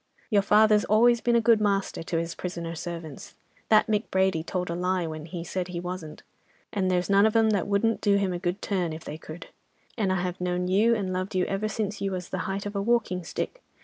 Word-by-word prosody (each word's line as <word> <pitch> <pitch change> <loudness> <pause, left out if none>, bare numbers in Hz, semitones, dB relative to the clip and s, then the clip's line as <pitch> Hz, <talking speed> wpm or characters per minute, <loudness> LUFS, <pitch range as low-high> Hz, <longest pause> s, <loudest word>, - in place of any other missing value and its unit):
Your 205 -2 +5
father's 210 +1 +5
always 235 +2 +4
been 240 -1 +2
a 235 - +4
good 230 -2 +5
master 200 -4 0
to 165 0 -2
his 165 +1 -2
prisoner 170 -2 -5
servants, 165 -3 -7 0.3
that 215 - +6
Mick 215 0 -1
Brady 190 -3 +2
told 180 +1 -3
a - - -1
lie 180 0 0
when 155 -1 -6
he 170 0 -6
said 180 +1 -3
he 180 -2 -5
wasn't, 175 -3 -7 0.5
and 190 -3 0
there's 180 -1 +1
none 200 +1 +5
of 220 - -2
'em 225 -1 +4
that 200 -4 0
wouldn't 205 +3 +1
do 205 -2 +3
him 195 -2 0
a 175 - -3
good 180 +2 -3
turn, 180 -5 -1
if 160 +1 -8
they 155 - -7
could; 160 +2 -10 0.5
and 195 -3 +1
I 185 - +1
have 180 0 -4
known 180 0 -1
you 215 +5 +4
and 190 -4 -2
loved 185 +1 -3
you 185 - +2
ever 195 +2 -1
since 210 -1 -3
you 195 -1 -1
was 180 -1 -5
the 185 - -3
height 195 +1 -3
of 205 0 -5
a 200 - 0
walking 210 -5 +1
stick. - - -5
190 Hz, 240 wpm, -26 LUFS, 175-210 Hz, 0.5 s, that